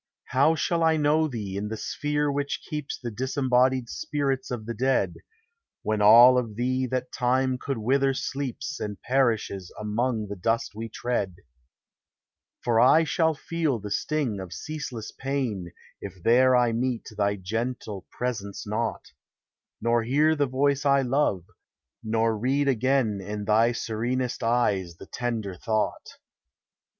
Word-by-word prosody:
How 140 +5 +4
shall 170 +1 0
I 160 -1 +4
know 155 +1 +3
thee 105 -8 -5
in 100 +1 -3
the 110 +1 -4
sphere 150 +3 -1
which 140 0 -2
keeps 150 -2 -4
The 120 -2 -6
disembodied 130 +1 +1
spirits 135 0 -2
of 120 -3 -4
the 115 - -4
dead, 130 +4 +1 0.7
When 110 -1 0
all 120 +4 +8
of 115 -4 -5
thee 130 +2 0
that 130 +1 -3
time 130 +1 +1
could 135 0 -3
wither 135 +4 +2
sleeps 140 +3 -4
And 105 -1 -5
perishes 115 -8 0
among 110 +1 -1
the 100 - -5
dust 115 +5 -1
we 115 +2 -6
tread? 105 -8 -2 1.3
For 115 -2 +2
I 130 +7 +6
shall 160 +1 +1
feel 160 -3 -1
the 105 -1 -7
sting 135 -4 -1
of 95 -2 -7
ceaseless 145 -8 -6
pain 125 -10 -3 0.3
If 95 -3 -9
there 130 +2 +5
I 120 -1 +3
meet 120 +1 -2
thy 100 -1 +1
gentle 105 +1 -4
presence 115 -5 -4
not; 110 +2 -3 0.7
Nor 115 +1 +2
hear 145 +7 +3
the 145 -2 +1
voice 140 +2 +1
I 140 -1 +4
love, 125 - +1 0.6
nor 115 0 +1
read 135 +6 0
again 130 -5 +1
In 105 +1 -5
thv 115 +3 +3
serenesl 120 +3 -2
eyes 105 -7 +1
the - - -11
tender 115 -6 -3
thought. 110 +3 -2
125 Hz, 145 wpm, -26 LUFS, 110-135 Hz, 1.3 s, all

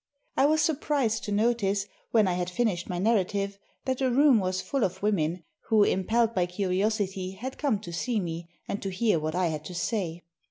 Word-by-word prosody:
I 275 - +4
was 310 0 +3
surprised 285 -7 0
to 205 - -4
notice, 205 -2 +1 0.2
when 220 -4 +4
I 180 - +1
had 180 0 -1
finished 185 -4 -1
my 180 - -2
narrative, 200 -1 0 0.3
that 260 -1 -1
the 265 -1 +2
room 265 -1 +5
was 185 -1 -1
full 275 +2 -1
of 190 +1 -2
women, 175 -4 0 0.2
who, 220 -2 +5
impelled 225 +5 +2
by 180 -3 +1
curiosity, 190 0 -1
had 250 +7 -7
come 275 -8 +2
to 170 - -8
see 230 +6 0
me, 170 -2 -5 0.2
and 200 - -3
to 195 - -3
hear 190 -1 +1
what 155 +2 -3
I 180 -2 +2
had 155 -1 -4
to 180 - -7
say. 175 -3 -2
200 Hz, 200 wpm, -28 LUFS, 180-230 Hz, 0.3 s, room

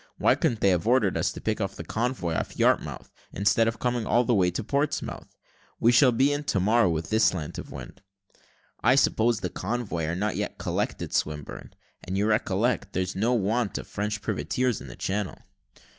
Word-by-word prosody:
Why - - +4
couldn't 115 -3 0
they 100 - +4
have 90 +3 +1
ordered 115 -6 +3
us - - 0
to - - -8
pick 110 0 -1
the 95 -4 -3
convoy 110 -3 -2
off - - -3
Yarmouth, - - +1 0.2
instead 105 +4 +2
of 115 - -1
coming 120 -3 -1
all 120 - +3
the 120 - +1
way 95 -4 +3
to 90 +6 -4
Portsmouth? 140 +6 -2 0.4
We 115 - +5
shall 125 +2 +6
be 135 +5 +3
in 145 +1 -2
to 100 - +1
morrow, 110 +1 +3
with 80 +2 -3
this 110 +1 +4
slant 80 -5 -1
of - - -9
wind." - - -9 0.8
"I 125 +3 +5
suppose 115 -4 +2
the 90 - -3
convoy 100 -5 -3
are 80 +2 -2
not 105 +3 -1
yet - - -3
collected, - - -3
Swinburne; 75 -1 -3 0.3
and 95 +2 -3
you 100 - +1
recollect, 110 +2 0
there's 95 +1 -2
no 110 +6 +1
want 110 -2 0
of - - -6
French 105 +1 -3
privateers 120 +3 -1
in - - -9
the - - -9
Channel." 100 0 -3
105 Hz, 195 wpm, -26 LUFS, 95-120 Hz, 0.8 s, shall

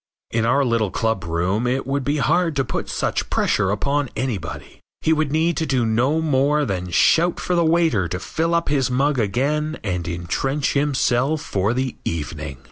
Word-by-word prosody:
In 115 0 +1
our 140 +3 +3
little 115 -4 +1
club 110 -2 -1
room 90 +8 0
it 130 +2 -1
would 140 0 -1
be 145 +3 0
hard 165 +3 +1
to 135 -1 +1
put - - -4
such - - -2
pressure 105 -3 +1
upon 140 +7 0
anybody. 105 - -4 0.2
He 160 - +3
would 155 -2 0
need 160 +2 +1
to 160 - -1
do 125 -4 +1
no 125 +8 +1
more 145 0 +2
than 90 -3 -3
shout 165 - +3
for 180 - -2
the 170 -1 +3
waiter 160 - +2
to 90 +2 -4
fill 165 - -1
up 170 - 0
his 140 -3 +1
mug 135 +2 +1
again 145 +9 0
and 90 -4 -2
intrench 90 - -1
himself 140 0 +1
for 100 +4 0
the 130 -1 -2
evening. 75 -3 -4
130 Hz, 185 wpm, -21 LUFS, 100-150 Hz, 0.2 s, our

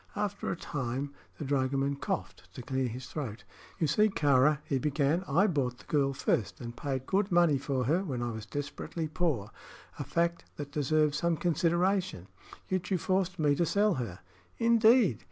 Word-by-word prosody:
After 205 -1 -2
a - - -1
time 135 -2 -4 0.2
the 150 - -5
dragoman 135 0 +1
coughed 90 -8 -4
to 125 - -7
clear 130 +1 -1
his 125 +2 -6
throat. 115 -9 -5 0.3
"You 165 - +1
see, 210 +9 +3
Kāra," 145 -4 +3
he 135 - 0
began, 150 +5 +1
"I 170 +8 +4
bought 135 -10 0
the - - -17
girl 140 -2 +2
first, 100 -8 -1
and 120 0 -7
paid 130 -1 -3
good 195 +4 +1
money 170 -5 +4
for 135 -2 -1
her 165 +9 +1
when 130 -9 -3
I 120 - -2
was 110 -1 -7
desperately 145 +4 -4
poor 150 - -1 0.5
a - - -1
fact 170 0 -1
that 145 -1 -6
deserves 150 +1 +1
some 170 -1 +1
consideration; 175 - +1 0.4
yet 185 -1 -2
you 190 - +2
forced 185 +1 0
me 150 -2 +3
to 155 - +1
sell 205 +4 +2
her." 95 -6 -6 0.4
"Indeed!" 230 - +5
145 Hz, 175 wpm, -30 LUFS, 130-175 Hz, 0.5 s, Indeed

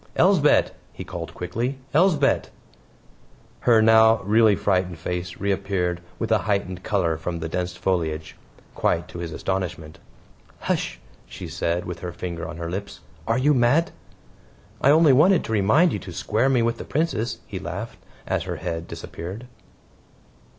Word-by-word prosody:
"Elsbeth," 175 -5 +4 0.2
he - - -8
called 85 -2 -6
quickly. 120 +9 -3 0.2
"Elsbeth!" 155 -3 +3 1.1
Her 115 -3 +4
now 110 0 +6
really 110 +1 +4
frightened 90 -4 0
face 90 +1 -4
reappeared 95 -3 -1 0.2
with - - -3
a - - +4
heightened 100 -3 -2
color 90 -6 0
from 85 +2 -4
the 80 0 -4
dense 90 +2 -3
foliage 80 -4 -2 0.4
quite 85 0 0
to 85 - -8
his 85 -1 -5
astonishment. 85 -3 -4 0.6
"Hush," - - -2 0.3
she - - -8
said, 85 +1 -2
with 90 -1 -6
her 90 0 -5
finger 85 -1 -5
on - - -8
her 85 0 -5
lips. 100 0 -6 0.3
"Are 115 - +2
you 145 +4 +3
mad?" 135 +7 +3 0.9
"I 135 - +4
only 155 -1 +6
wanted 175 +7 +5
to - - -6
remind 110 - +4
you 105 - -2
to 95 - -9
square 110 +9 0
me 125 -3 +3
with 115 0 -1
the - - -5
Princess," 135 -7 -1
he - - -6
laughed - - -6 0.3
as - - -1
her - - -3
head 85 0 -4
disappeared. 95 +8 -7
100 Hz, 155 wpm, -24 LUFS, 90-120 Hz, 1.1 s, now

